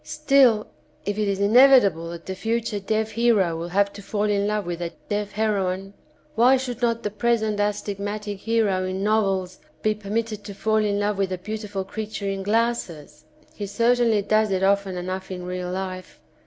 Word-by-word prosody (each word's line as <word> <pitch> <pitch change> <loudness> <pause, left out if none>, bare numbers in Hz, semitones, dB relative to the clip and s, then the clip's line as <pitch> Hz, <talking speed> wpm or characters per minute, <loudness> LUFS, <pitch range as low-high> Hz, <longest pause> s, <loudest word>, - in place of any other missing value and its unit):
Still 275 -8 +3 0.4
if 205 +1 -2
it 210 - +1
is 195 -1 -1
inevitable 205 -6 +5
that 170 0 -8
the 190 - -4
future 225 +1 -2
deaf 220 +2 -1
hero 215 -7 +2
will 165 +1 -4
have 200 +3 +1
to 205 - -9
fall 205 +1 -2
in 205 -1 +1
love 210 -1 -1
with 175 0 -4
a 170 -1 -3 0.2
deaf 205 -1 -2
heroine, 195 -2 -1 0.4
why 250 +4 +5
should 250 -2 -5
not 230 -1 0
the 210 - -2
present 220 -1 0
astig 205 -1 -1
matic 205 0 -4
hero 210 -4 +1
in 185 +1 -3
novels 195 -4 0 0.2
be 215 - +3
permitted 215 +1 -3
to 200 - -7
fall 220 +2 +1
in 205 -1 0
love 205 -1 -1
with 195 -1 0
a 185 - -2
beautiful 205 0 -5
creature 210 +1 -5
in 195 0 -2
glasses? 190 -9 -2 0.3
He 205 - -5
certainly 230 0 +2
does 215 +1 +2
it 190 -1 0
often 195 -1 +1
enough 185 +1 -5
in 180 -1 -6
real 180 0 -4
life. 185 0 -6
205 Hz, 185 wpm, -24 LUFS, 190-220 Hz, 0.4 s, inevitable